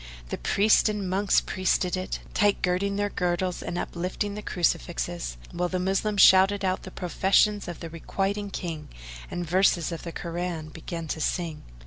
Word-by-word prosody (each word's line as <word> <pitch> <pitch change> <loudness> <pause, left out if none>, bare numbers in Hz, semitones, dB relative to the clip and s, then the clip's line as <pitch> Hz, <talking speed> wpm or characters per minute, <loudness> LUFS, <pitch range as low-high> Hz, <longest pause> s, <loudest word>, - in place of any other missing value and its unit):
The - - -4
priests 205 - +4
and 205 -2 -2
monks 195 +2 +3
priested 185 -1 0
it, 185 0 -4
tight 205 -1 +2
girding 185 +2 +1
their 205 0 -1
girdles 180 0 -1
and 175 - -4
uplifting 180 +4 -3
the 210 - -5
Crucifixes, - - -1
while 175 +1 -1
the 185 - -1
Moslem 195 +3 0
shouted 195 +1 +6
out 185 0 0
the - - -8
professions 195 +3 +2
of 175 - -7
the 165 - -5
Requiting 195 +5 -2
King 165 -5 -5 0.4
and 175 -1 -4
verses 180 -1 +3
of 165 - -5
the 170 - -6
Koran 170 -2 -4
began 165 +1 -6
to 160 - -3
sing. 165 -2 -2
180 Hz, 165 wpm, -27 LUFS, 170-195 Hz, 0.4 s, shouted